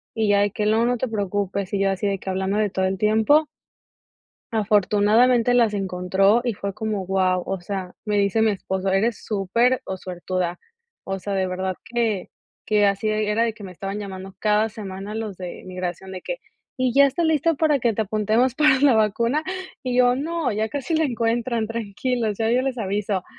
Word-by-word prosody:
Y 220 -2 +1
ya, 200 0 +4
de 205 0 +1
que: 210 - -2
"No, 220 +2 +3
no 245 +1 +1
te 260 - -2
preocupes". 200 -2 -2
Y 200 - +1
yo, 195 - +3
así 195 +2 -1
de 195 -1 -1
que 190 - -6
hablándole 195 +3 0
todo 190 0 -1
el 190 0 -1
tiempo. 220 +9 +4 1.0
Afortunadamente, 220 +3 +3
las 235 -3 +3
encontró, 195 +2 +2
y 240 -2 0
fue 200 0 -5
como 215 -1 -2
wao. 185 -1 +1
O 195 -1 -3
sea, 185 0 -5
me 210 -1 0
dice 200 +2 +2
mi 220 -1 +4
esposo: 190 -1 -2
"Eres 210 +4 0
súper 230 +5 +1
o 190 - -4
suertuda". 180 -1 -3 0.4
O 195 0 -4
sea, 200 +2 -4
de 190 -1 0
verdad 185 0 -2
que 225 -5 -1 0.4
que 210 -2 +4
así 200 +2 0
era 215 +1 +1
de 230 -1 0
que 210 -1 -13
me 190 - -7
estaban 195 +3 -5
llamando 190 -1 -8
cada 215 +1 +2
semana 200 -1 -7
los 215 -4 -5
de 180 -2 -7
migración, 185 0 -5
de 185 -1 -7
que: - - -4 0.4
"Y, 255 -2 +1
¿ya 280 +1 +7
está 280 +5 0
listo 320 0 +2
para 300 -3 +3
que 235 -2 +1
te 220 - -1
apuntemos 220 +5 +1
para 300 -3 +4
la 280 -2 +5
vacuna?". 230 +7 +1 0.4
Y 250 -1 -1
yo: 250 0 +5
"No. 310 0 -1
Ya 215 +1 -1
casi 285 +5 -2
la 320 - +2
encuentran. 235 -2 -1
Tranquilos, 230 0 -2
ya 225 -1 0
yo 250 +2 +3
les 260 -1 -2
aviso". 200 -2 -1
210 Hz, 200 wpm, -23 LUFS, 195-235 Hz, 1.0 s, ya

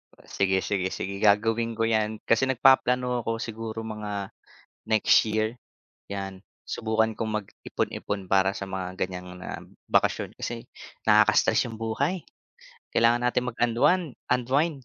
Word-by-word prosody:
Oh, - - -21
sige, 95 -1 0
sige, 95 -3 0
sige, 100 +1 -5
gagawin 115 +3 +2
ko 115 - 0
'yan. 110 -1 0
Kasi 115 +3 +2
nagpaplano 125 -1 +3
ako, 115 -1 -3
siguro 115 0 -5
mga 105 -3 -5 0.6
next 110 -1 +5
year, 110 +1 0 0.6
'yan. 95 -1 -6 0.2
Subukan 110 0 0
kong 110 -1 -1
mag-ipon-ipon 100 0 -4
para 95 0 +4
sa 100 - -6
mga 95 -1 -5
ganyang, 90 -1 -4
ah, - - -6 0.3
bakasyon - - +1
kasi 120 0 -5 0.4
nakaka-stress - - +5
'yung 115 -2 -7
buhay. 140 +11 -1 0.7
Kailangan 120 +1 +4
natin 125 0 0
mag-unwan 120 +9 +2 0.3
unwind. 135 +4 +1
110 Hz, 130 wpm, -26 LUFS, 100-120 Hz, 0.7 s, next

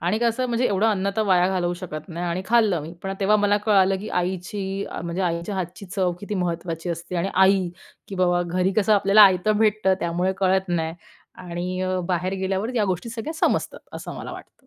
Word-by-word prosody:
आणि 180 +6 0
कसं 235 +2 +1
म्हणजे 240 +1 0
एवढं 200 +2 +1
अन्न 200 -3 +1
तर 220 - +2
वाया 180 -2 +4
घालवू 180 -2 0
शकत 170 -2 -7
नाही 175 +1 -4
आणि 175 +2 -2
खाल्लं 215 -6 +3
मी 160 +3 -8
पण 195 0 -3
तेव्हा 205 +2 +4
मला 205 0 +3
कळालं, 195 -2 +4
की 210 - -7
आईची 190 +2 -2 0.2
म्हणजे 170 +2 -3
आईच्या 170 +2 -2
हातची 185 +1 -5
चव 185 -1 0
किती 205 +1 -5
महत्त्वाची 170 -2 -3
असते 170 +2 -5
आणि 175 +3 0
आई, 190 -1 +4 0.4
की 195 - -6
बाबा, 175 -1 +2
घरी 180 +2 0
कसं 215 0 +3
आपल्याला 200 +1 +6
आयत 190 0 +5
भेटतं, 215 -2 +3
त्यामुळे 175 +2 0
कळत 190 0 +2
नाही 165 -2 -1 0.6
आणि 180 +2 -3
अ, 185 0 0
बाहेर 180 +1 0
गेल्यावर 195 +5 -2
या 220 - +2
गोष्टी 185 +2 -2
सगळ्या 230 +7 -5
समजतात, - - +1
असं - - -7
मला - - -7
वाटतं. 260 - -13
190 Hz, 200 wpm, -23 LUFS, 175-205 Hz, 0.6 s, आपल्याला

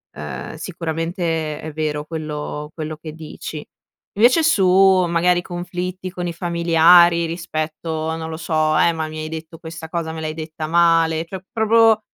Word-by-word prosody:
ehm, 75 - -6
sicuramente 165 -1 -3
è 155 -1 -7
vero 150 -1 -2
quello 150 -1 -5
quello 155 -1 -5
che 155 0 -9
dici. 155 -1 -8 0.5
Invece 250 +9 +5
su 220 -12 +3 0.4
magari 175 +1 +2
conflitti 180 +1 -5
con 180 -1 -4
i 170 - -3
familiari 170 0 +5
rispetto, 160 -1 -3
non 160 0 -5
lo 160 - -5
so, 155 -1 +1
"eh 170 - +4
ma 160 -1 -3
mi 155 0 -7
hai 155 - -4
detto 160 +1 -8
questa 160 -1 -8
cosa, 160 -1 -3
me 160 - -6
l'hai 155 0 -3
detta 155 0 -6
male", 165 -1 +3
cioè 190 +3 -7
proprio 225 -1 +4
165 Hz, 160 wpm, -20 LUFS, 155-175 Hz, 0.5 s, Invece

